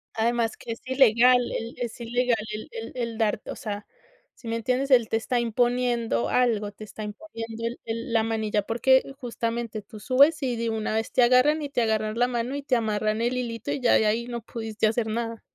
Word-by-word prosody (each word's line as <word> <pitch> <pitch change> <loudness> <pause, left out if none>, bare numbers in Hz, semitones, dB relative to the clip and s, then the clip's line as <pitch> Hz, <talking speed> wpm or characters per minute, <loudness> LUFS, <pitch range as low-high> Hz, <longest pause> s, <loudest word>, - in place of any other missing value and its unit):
Además, 230 0 0
que 230 - -7
es - - -13
ilegal 250 -1 +5
el 230 +1 -4
es 240 -1 -5
ilegal 245 0 +1
el 215 0 -6
el 225 0 -7
el 235 -2 -3
darte 215 -2 -1
o - - -5
sea, 205 -1 -5 0.5
¿sí 235 - -13
me 225 - -1
entiendes? 255 +4 -1
Él 240 -4 +6
te 225 - +1
está 240 +2 -1
imponiendo 235 - +1
algo. 220 -5 +1
Te 215 - -11
está 215 0 -8
imponiendo 230 -1 -7
el 235 +1 -4
el 230 +1 -4
la 225 -1 +3
manilla 215 -2 0
porque, 255 +4 +3 0.2
justamente, 230 -2 -3
tú 210 +1 -12
subes 280 +6 +4
y 250 -2 0
de 230 0 -2
una 220 0 -2
vez 225 - -1
te 255 - +3
agarran, 255 +6 +4
y 290 - -4
te 250 -3 0
agarran 215 0 0
la 245 +1 +3
mano 245 +2 -2
y 285 - -4
te 260 -3 +1
amarran 215 -1 0
el 245 +2 0
hilito, 230 -3 -3
y - - -1
ya 245 - +4
de 220 - +4
ahí 230 +3 0
no 240 -1 -4
pudiste 220 -1 -2
hacer 220 0 0
nada. 230 0 -3
230 Hz, 215 wpm, -26 LUFS, 220-245 Hz, 0.5 s, Él